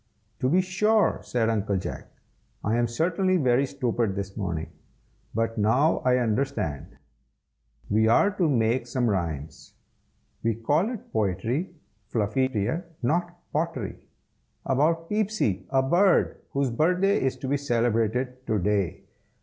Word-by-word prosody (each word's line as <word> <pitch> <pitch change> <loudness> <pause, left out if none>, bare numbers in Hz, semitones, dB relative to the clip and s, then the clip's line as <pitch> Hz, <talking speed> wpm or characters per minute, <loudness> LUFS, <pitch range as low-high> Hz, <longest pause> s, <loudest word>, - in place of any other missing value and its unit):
"To 130 - +1
be 180 +6 +4
sure!" 210 +4 +2
said 115 -2 0
Uncle 105 -3 0
Jack. 95 - -5 0.6
"I 110 +2 +1
am 120 0 +2
certainly 175 +9 +1
very 135 -2 +2
stupid 115 -6 -1
this 95 -1 -5
morning, 85 -6 -3 0.6
but 115 0 -1
now 125 +10 +3
I 125 0 +2
understand. 110 - -2 0.9
We 110 +2 +3
are 200 - +4
to 185 -5 +1
make 120 -1 +1
some 120 0 0
rhymes, 80 -8 -3 0.7
(we 115 -1 0
call 145 - +1
it 240 -4 -8
poetry, 110 - -1 0.3
Fluffy 115 +4 +1
dear, 130 - -2 0.2
not 175 +6 0 0.2
pottery,) 145 - -3 0.6
about 160 +5 +1
Peepsy, 210 - 0
a 135 -1 +2
bird, 175 +8 +3
whose 140 -2 0
birthday 180 - +2
is 130 -1 0
to 135 - -6
be 140 +2 +1
celebrated 120 0 0
to 110 - +1
day. 100 -2 0
125 Hz, 135 wpm, -26 LUFS, 110-160 Hz, 0.9 s, be